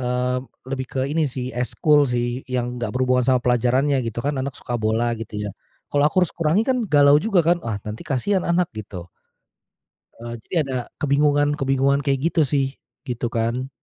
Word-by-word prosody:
Eee, 125 0 0 0.3
lebih 130 0 -3
ke 130 - -3
ini 155 -1 +1
sih 130 0 -5
ekskul 145 +4 +2
sih 120 +1 -1
yang 125 -1 -2
enggak 120 -3 -2
berhubungan 125 -1 +2
sama 130 -1 +5
pelajarannya 125 +3 +2
gitu 115 0 -4
kan. 145 +1 0
Anak 135 0 -4
suka 120 - -6
bola 110 +2 +1
gitu 110 -1 -7
ya, 105 0 -3 0.4
kalau 145 0 +3
aku 185 +2 +3
harus - - -8
kurangi 170 +5 +2
kan 260 -1 +2
galau 145 -2 +6
juga 200 -1 +2
kan, 175 +1 +3
"Wah 110 -3 -3
nanti 105 +1 -6
kasihan 185 +9 0
anak," 170 0 +1
gitu. 95 -5 -8 1.1
Eee, 120 0 -7
jadi - - -5
ada 130 -1 -2 0.2
kebingungan-kebingungan 140 -1 +2
kayak 135 -1 +1
gitu 165 - +2
sih, 135 0 +1 0.4
gitu 120 -2 -2
kan. 115 +3 -2
130 Hz, 180 wpm, -22 LUFS, 120-145 Hz, 1.1 s, galau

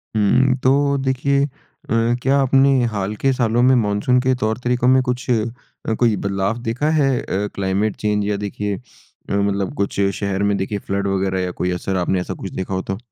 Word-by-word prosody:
हुँ, 125 +5 +3
तो 140 +1 +3
देखिए 135 +1 +1
अ, - - -4 0.7
क्या 135 +2 +2
आपने 135 -1 +4
हाल 100 0 -3
के 135 +5 +1
सालों 120 -1 +1
में 130 +1 +5
मानसून 105 +5 +1
के 130 0 +2
तौर 110 -2 -1
तरीकों 125 0 +1
में 130 0 +5
कुछ 125 0 -2 0.7
कोई 115 -3 +3
बदलाव 100 +3 -1
देखा 120 +6 -1
है 135 - +3
अ, 100 +2 -2
क्लाइमेट 100 +2 0
चेंज 105 -1 -1
या 105 -1 0
देखिए 105 0 -3 0.6
मतलब 100 -1 0
कुछ 100 0 -2 0.2
शहर 100 -1 -1
में 100 0 +2
देखिए 100 +2 -2
फ़्लड 100 +1 -2
वगैरह 95 -1 0
या 90 - -2
कोई 90 +1 -2
असर 90 +2 -2
आपने 90 +1 0
ऐसा 90 - -4
कुछ - - -7
देखा 95 +1 -4
हो 95 - -1
तो? 95 0 -4
105 Hz, 190 wpm, -20 LUFS, 100-130 Hz, 0.7 s, में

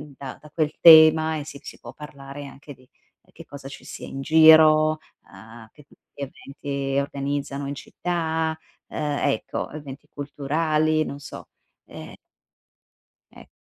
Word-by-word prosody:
da 135 -1 -9
da 150 - -16
quel 155 -1 -1
tema 160 -1 +7
e 145 - -6
si 145 -2 -10
si - - -11
può - - -11
parlare 140 -1 -10
anche 140 +1 -12
di 130 0 -23 0.5
che - - -12
cosa 140 -1 -11
ci 135 - -11
sia - - -9
in 135 - -7
giro, 155 0 +6 0.3
uhm, 110 +3 -14
che 150 - -18
tipo 140 - -25 0.2
di - - -10
eventi 140 0 -5
organizzano 140 0 -3
in 140 - -5
città, 160 0 -3 0.3
ehm, 145 -1 -3
ecco, 140 - -3
eventi 145 -1 -10
culturali, 155 +2 0
non 140 -2 -7
so, 140 - -11 0.4
ehm - - -11 1.2
Eh. - - -14
145 Hz, 145 wpm, -23 LUFS, 140-155 Hz, 1.2 s, tema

